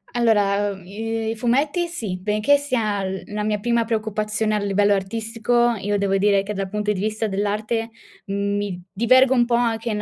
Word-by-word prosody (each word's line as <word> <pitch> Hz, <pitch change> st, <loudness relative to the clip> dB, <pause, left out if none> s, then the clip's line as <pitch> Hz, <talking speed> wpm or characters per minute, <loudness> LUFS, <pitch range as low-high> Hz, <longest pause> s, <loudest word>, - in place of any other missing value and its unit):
Allora, 205 Hz, -3 st, +2 dB
uhm, 190 Hz, -2 st, -13 dB
i 225 Hz, +3 st, -3 dB
i -, -, -4 dB
fumetti 280 Hz, +9 st, +1 dB
sì, 225 Hz, -, -4 dB
benché 215 Hz, +8 st, +2 dB
sia 225 Hz, -8 st, -1 dB
l 190 Hz, 0 st, -4 dB
la 210 Hz, -, -2 dB
mia 210 Hz, 0 st, 0 dB
prima 235 Hz, +2 st, +1 dB
preoccupazione 215 Hz, -1 st, -1 dB
a 210 Hz, -, +1 dB
livello 205 Hz, 0 st, +2 dB
artistico, 225 Hz, +4 st, 0 dB
io 205 Hz, +1 st, -1 dB
devo 195 Hz, -1 st, +1 dB
dire 200 Hz, 0 st, +3 dB
che 210 Hz, -, -4 dB
dal 195 Hz, -1 st, -3 dB
punto 210 Hz, +1 st, -1 dB
di 200 Hz, -, -2 dB
vista 215 Hz, +2 st, -1 dB
dell'arte 210 Hz, +3 st, -2 dB, 0.4 s
mi 200 Hz, -2 st, -2 dB
divergo 255 Hz, +5 st, +4 dB
un 240 Hz, -2 st, +3 dB
po' 235 Hz, 0 st, +1 dB
anche 230 Hz, -1 st, 0 dB
in 210 Hz, -1 st, -2 dB
215 Hz, 185 wpm, -22 LUFS, 200-230 Hz, 0.4 s, divergo